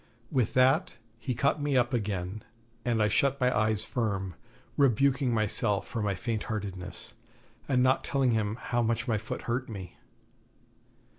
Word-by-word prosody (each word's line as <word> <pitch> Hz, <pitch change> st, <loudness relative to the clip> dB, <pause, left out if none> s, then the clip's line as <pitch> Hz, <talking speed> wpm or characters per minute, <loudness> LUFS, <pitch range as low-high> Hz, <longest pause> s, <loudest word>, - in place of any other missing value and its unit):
With 125 Hz, -6 st, +1 dB
that 135 Hz, +8 st, +4 dB, 0.3 s
he 125 Hz, 0 st, -2 dB
caught 140 Hz, +5 st, +1 dB
me 145 Hz, -2 st, +1 dB
up 120 Hz, +1 st, +2 dB
again, 100 Hz, -3 st, -2 dB, 0.4 s
and 115 Hz, -3 st, +2 dB
I -, -, +4 dB
shut 140 Hz, +6 st, +2 dB
my 125 Hz, -1 st, +2 dB
eyes 110 Hz, 0 st, +1 dB
firm, 100 Hz, -6 st, -2 dB, 0.4 s
rebuking 135 Hz, 0 st, +3 dB
myself 110 Hz, -2 st, +1 dB
for 115 Hz, -, -3 dB
my 100 Hz, -2 st, 0 dB
faint 110 Hz, +3 st, -3 dB
heartedness, 95 Hz, -5 st, -5 dB, 0.6 s
and 125 Hz, -2 st, +3 dB
not 130 Hz, +1 st, +3 dB
telling 135 Hz, -3 st, +1 dB
him 110 Hz, -2 st, 0 dB
how 120 Hz, 0 st, -1 dB
much 115 Hz, +1 st, 0 dB
my 110 Hz, -3 st, +1 dB
foot 110 Hz, -, -6 dB
hurt 125 Hz, +2 st, -2 dB
me. 95 Hz, -5 st, -8 dB
115 Hz, 155 wpm, -29 LUFS, 105-130 Hz, 0.6 s, that